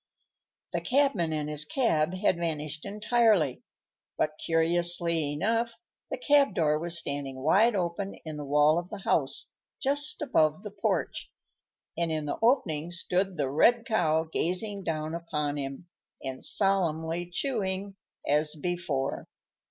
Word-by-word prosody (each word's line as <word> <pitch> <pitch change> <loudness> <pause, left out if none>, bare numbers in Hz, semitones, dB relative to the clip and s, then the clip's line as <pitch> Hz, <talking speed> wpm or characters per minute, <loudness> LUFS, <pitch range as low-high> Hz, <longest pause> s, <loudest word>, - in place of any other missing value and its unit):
The - - -1
cabman 255 - +2
and 150 -1 -2
his 150 0 +1
cab 165 - +1
had 185 -2 +1
vanished 155 -3 -3
entirely, 210 - +2 0.6
but, 155 0 -1
curiously 170 -1 +2
enough, 230 +8 0 0.3
the - - -3
cab 280 -4 +3
door 150 -2 +2
was 170 +1 +2
standing 140 -4 -4
wide 210 +9 +4
open 185 +2 -2
in 155 -1 -5
the 150 - -5
wall 150 +3 +4
of 175 +1 -8
the - - -6
house, - - 0 0.3
just 290 +2 0
above 155 - +2
the 210 - -7
porch, 200 0 -2 0.6
and 170 -1 -1
in 155 -1 -2
the 145 - -3
opening 175 - +2
stood 180 +1 -1
the 140 -3 -1
red 230 - +4
Cow 160 -9 +2
gazing 185 +5 -1
down 155 -2 -3
upon 150 -3 -2
him, 140 +4 -6 0.4
and 130 -1 -5
solemnly 175 -3 +1
chewing, 195 -5 -2 0.3
as 150 +2 +1
before. 160 -5 -3
170 Hz, 135 wpm, -28 LUFS, 155-200 Hz, 0.6 s, wide